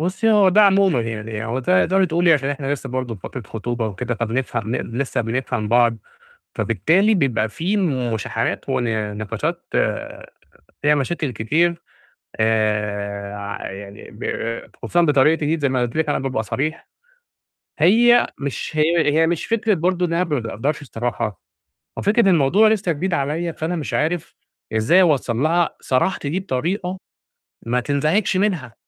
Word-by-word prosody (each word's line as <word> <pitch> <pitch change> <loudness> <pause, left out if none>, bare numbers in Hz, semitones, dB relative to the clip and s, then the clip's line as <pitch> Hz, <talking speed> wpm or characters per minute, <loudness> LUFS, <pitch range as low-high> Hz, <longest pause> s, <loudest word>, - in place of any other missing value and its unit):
بُصي 190 +7 +1
هو 205 -3 +5
ده 205 +3 +5
عمومًا 195 -8 +4
يعني، 110 -1 -4
هو 115 +3 -2
ده 95 -8 +3
تقدري 190 +1 +3
تقولي 170 +1 +3
عشان 140 -2 +1
إحنا 145 -1 -2
لسه 135 -1 -4
برضه 125 -2 -3
في 100 - -13
فترة 125 +5 -7
خطوبة 115 +2 -4
وكده، 115 +4 -3
فبنفهم 115 -1 -2
نق - - -2
لسه 125 +3 -2
بنفهم 115 -2 -2
بعض، 120 0 +3 0.6
فبالتالي 165 - +2
بيبقى 130 - +1
في 175 - -2 0.4
مشاحنات 110 - -3
ون 110 -4 -1
نقاشات 110 -2 -3 1.2
فيها 150 +1 +4
مشاكل 150 +1 -1
كتير، 170 +10 0 0.6
آآ، 105 -2 -1
ع 100 -1 -6
يعني 100 +1 -10
ب - - -10 0.5
خصوصًا 175 - +1
بطريقتي 150 0 +3
دي، 160 +2 0
زي 140 -2 +1
ما 130 -1 0
قُلت 120 -1 -2
لِك 160 -1 0
أنا 145 - +1
بابقى 130 -4 -2
صريح، 150 +9 -3 0.9
هي 235 +9 +5
مش 140 -2 -4
هي 155 0 +3
هي 160 +2 +3
مش 170 -1 -1
فكرة 225 -2 +1
برضه 180 +1 0
إن 165 - -4
أنا 170 +2 +2
ما 150 -6 -1
باقدرش 115 +7 -3
الصراحة، 115 -5 -4 0.6
هو - - -3
فكرة 205 0 +4
الموضوع 175 +6 +4
لسه 210 -5 +1
جديد 175 +4 -2
عليَّ، 160 +4 -1
فأنا 160 +3 -3
مش 155 -4 -4
عارف 160 +2 -1 0.4
إزاي 110 +13 +4
أوصّل 140 -9 +2
لها 165 +5 +1
صراحتي 140 +3 0
دي 175 +6 -1
بطريقة 180 +4 -2 0.7
ما 120 +2 +1
تنزعجش 155 - +1
منها، 180 - -1
145 Hz, 155 wpm, -21 LUFS, 115-175 Hz, 1.2 s, هو